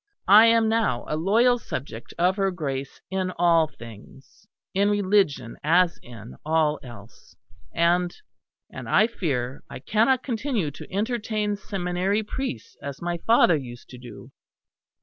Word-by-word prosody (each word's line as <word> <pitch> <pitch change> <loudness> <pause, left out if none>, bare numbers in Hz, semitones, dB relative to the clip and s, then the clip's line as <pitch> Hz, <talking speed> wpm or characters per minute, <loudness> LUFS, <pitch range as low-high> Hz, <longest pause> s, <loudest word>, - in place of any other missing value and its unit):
I 220 +2 +9
am 230 -1 +4
now 220 - 0
a 155 - -2
loyal 230 +9 +3
subject 125 - -7
of 180 +2 +2
her 195 -1 +1
Grace 140 -7 -5
in 190 -1 -1
all 165 -2 +4
things; 120 - -15 0.3
in 200 +2 +2
religion 195 - +1
as 170 +3 +3
in 115 -2 -12
all 155 -1 +1
else. 115 -3 -14 0.4
And 175 +1 +2 0.6
and - - -8
I 215 - +5
fear 135 - -3
I - - -7
cannot 225 - +1
continue 230 - -2
to - - -12
entertain 210 0 -1
seminary 195 +1 -2
priests 210 - -5
as 140 -1 -7
my 175 0 -3
father 225 -7 +5
used 120 -4 -8
to 125 - -11
do. 125 -1 -12
175 Hz, 140 wpm, -24 LUFS, 140-210 Hz, 0.6 s, I